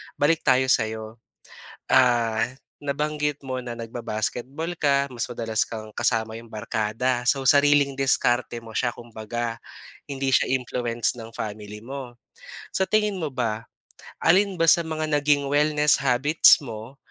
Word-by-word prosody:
balik 155 +2 +2
tayo 130 0 +4
sa'yo. 110 -1 -1 0.7
Ah, 120 -2 +3 0.3
nabanggit 150 0 -2
mo 130 -2 -5
na 120 - -5
nagba-basketball 120 +7 -4
ka 140 -2 +2
mas 120 -3 -3
madalas 115 -2 -1
kang 110 -1 -8
kasama 110 -1 0
'yong 115 0 -12
barkada. 110 +3 -1
So, 135 +1 +1
sariling 145 -1 +4
diskarte 125 -3 +1
mo 115 -1 -12
siya 120 -2 0
kumbaga, 115 0 -5 0.5
hindi 135 -1 -3
siya 130 - +2
influence 120 -2 -1
ng 115 -1 -9
family 105 -1 -7
mo. 130 +1 -8 0.6
Sa 190 - +2
tingin 210 0 +1
mo 155 -6 -4
ba, 115 -3 -2 0.6
alin 190 +3 +4
ba 165 - +1
sa 165 +1 +6
mga 160 -1 -3 0.2
naging 145 -1 +2
wellness 150 0 +3
habits 140 +4 +5
mo 115 +2 -8
125 Hz, 135 wpm, -24 LUFS, 115-145 Hz, 0.7 s, sa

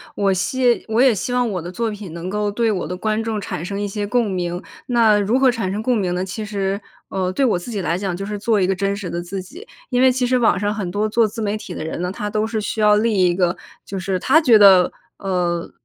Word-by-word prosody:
我 200 -1 +2
希 245 +6 +1
我 225 +2 +2
也 260 -2 +6
希 225 - -3
望 245 -1 +1
我 185 -4 -3
的 175 +2 -7
作 230 +5 -2
品， 205 -4 -8
能 170 +2 -5
够 210 +1 -1
对 230 +2 +1
我 195 - -2
的 180 - -5
观 215 +3 -1
众 225 -1 -2
产 175 -5 -5
生 200 +3 -4
一 205 - -1
些 205 +1 -3
共 235 +1 +1
鸣， 175 -1 -3 0.3
那 230 -4 +4
如 210 +6 +1
何 265 -1 +5
产 225 -6 -3
生 205 +2 -3
共 245 +1 +1
鸣 185 -4 -1
呢？ 180 +1 -1
其 190 +3 -5
实， 200 -1 -2 0.3
呃， 185 -1 -1
对 270 +9 +1
我 220 -7 +2
自 175 +7 -7
己 210 - -3
来 170 -1 -1
讲， 190 -2 -3
就 195 - -5
是 210 +1 -4
做 215 +1 +1
一 185 - +2
个 190 - +1
真 195 +1 -1
实 195 -4 -5
的 170 +1 -3
自 190 +2 -5
己。 330 - -12 0.2
因 250 -1 +1
为 260 0 +6
其 250 0 0
实 255 +1 +2
网 225 -6 +3
上 205 +1 0
很 205 -5 -4
多 210 +3 0
做 225 +2 +3
自 225 +2 -7
媒 210 -1 -1
体 215 - -7
的 - - -5
人 160 - -4
呢， 180 0 -2
他 210 +2 -4
都 215 +1 0
是 220 0 -2
需 215 +1 -3
要 210 0 +5
立 225 +1 +1
一 175 - +3
个， 180 -1 +1 0.3
就 195 - -6
是 185 0 -1
他 290 - +4
觉 245 -8 +6
得， 195 -3 +7 0.3
呃， 175 -3 -2
205 Hz, 300 characters per minute, -20 LUFS, 185-225 Hz, 0.3 s, 得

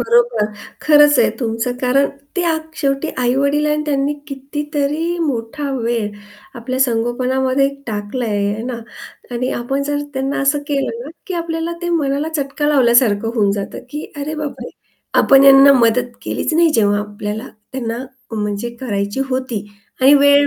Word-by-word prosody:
बरोबर 235 -1 +3 0.4
खरंच 295 -2 +6
आहे 235 - +4
तुमचं 230 +1 -1
कारण 270 +2 +3 0.3
ते 360 - +1
आक 315 0 -3
शेवटी 275 +1 0
आई-वडील 280 +4 +2
आहे 300 - +2
आणि 300 - -1
त्यांनी 280 0 +1 0.2
कितीतरी 295 +4 -2
मोठा 280 -1 -2
वेळ 230 -4 -1 0.4
आपल्या 255 +2 -4
संगोपनामध्ये 255 +2 +1 0.2
टाकला 215 +3 -3
आहे, 205 -1 0
हे 220 - -5
ना? 245 +1 -4 0.6
आणि 250 +2 -2
आपण 270 +4 -2
जर 290 +1 -1 0.2
त्यांना 270 +1 -1
असं 275 +1 +2
केलं 275 -5 -1
ना 295 - -8 0.2
की 370 - -3
आपल्याला 330 0 -2
ते 345 - -1
मनाला 295 -2 0
चटका 285 +1 -1
लावल्यासारखं 235 -6 +3
होऊन 205 -4 +2
जातं 200 -1 -4
की 300 +1 -5 0.2
अरे 300 +2 -3
बापरे 300 -2 -5 0.5
आपण 270 0 +6
यांना 275 0 +8
मदत 240 +1 +2
केलीच 320 - -2
नाही 330 0 +4
जेव्हा 205 -3 +3
आपल्याला 210 +3 -5 0.2
त्यांना 235 -3 -3 0.3
म्हणजे 210 +1 -2
करायची 205 -1 -2
होती 255 -5 -2 0.3
आणि 270 +3 +7
वेळ 285 0 +6
265 Hz, 150 wpm, -18 LUFS, 230-290 Hz, 0.6 s, यांना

